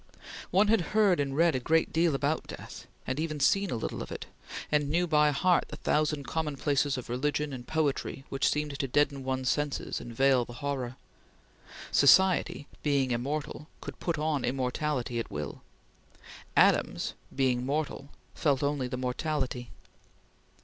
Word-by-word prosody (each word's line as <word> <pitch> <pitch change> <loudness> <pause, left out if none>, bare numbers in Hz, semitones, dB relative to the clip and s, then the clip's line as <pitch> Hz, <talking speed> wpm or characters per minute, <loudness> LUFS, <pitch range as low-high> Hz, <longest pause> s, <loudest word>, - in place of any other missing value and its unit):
One 200 +3 +4
had 220 -2 +4 0.2
heard 200 -6 +5
and 140 -1 -1
read 165 0 +4
a 130 - 0
great 160 +6 +1
deal 165 -2 +3
about 145 +3 -1
death, - - -9 0.2
and 130 +3 -2
even 155 -2 -2
seen 195 +7 +3
a - - -1
little 110 - -4
of - - -7
it, - - -6 0.5
and 145 -1 +2
knew 175 +4 +2
by 150 -3 +4
heart 175 +5 +2
the - - -8
thousand 150 -1 0
commonplaces 145 -2 0
of 125 - -6
religion 145 +4 -1
and 125 -2 -8
poetry 145 -3 -1
which 135 - +1
seemed 150 -2 -2
to 135 - 0
deaden 140 +1 +1
one's 130 -1 -1
senses 145 -2 -1
and 120 - -8
veil 135 -1 +4
the 120 - -10
horror. 130 -2 -3 1.0
Society 185 0 +4 0.2
being 140 -3 +1
immortal, 150 +5 -3
could - - -8
put 170 -2 -1
on 150 -2 0
immortality 125 -1 -1
at 115 - -4
will. 75 0 -5 1.0
Adams - - +3 0.2
being 130 -2 +1
mortal, 140 0 -2 0.2
felt 140 -3 +1
only 140 -3 0
the 125 - -4
mortality. 125 -1 -2
145 Hz, 155 wpm, -29 LUFS, 130-155 Hz, 1.0 s, heard